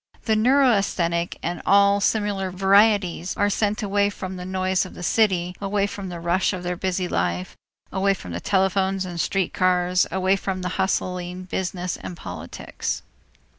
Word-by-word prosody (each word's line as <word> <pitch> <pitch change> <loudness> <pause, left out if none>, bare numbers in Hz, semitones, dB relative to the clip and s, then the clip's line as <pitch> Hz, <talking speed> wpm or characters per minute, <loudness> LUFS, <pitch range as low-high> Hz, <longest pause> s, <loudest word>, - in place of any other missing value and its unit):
The 220 - +2
neurasthenic 205 -9 +2
and 175 +1 -3
all 200 +1 +4
similar 205 -3 0
varieties 195 -1 +3
are 205 0 +2
sent 210 +1 0
away 200 0 +2
from 190 -2 -6
the 180 0 -7
noise 185 0 0
of 185 - -9
the 180 - -8
city, 180 -3 +2
away 200 0 +1
from 200 -1 -6
the 175 -1 -6
rush 175 +4 +1
of 180 -1 -5
their 180 0 -2
busy 185 0 -1
life, 90 - -2 0.4
away 195 +1 +2
from 90 - -9
telephones 190 - +1
and 175 -2 -3
street 195 -3 -1
cars, 180 0 +2
away 190 +1 +2
from 190 -1 -3
the 180 - -1
hustling 180 -1 -2
business 180 -1 -3
and 175 - -8
politics. 85 - -5
185 Hz, 160 wpm, -23 LUFS, 180-200 Hz, 0.4 s, all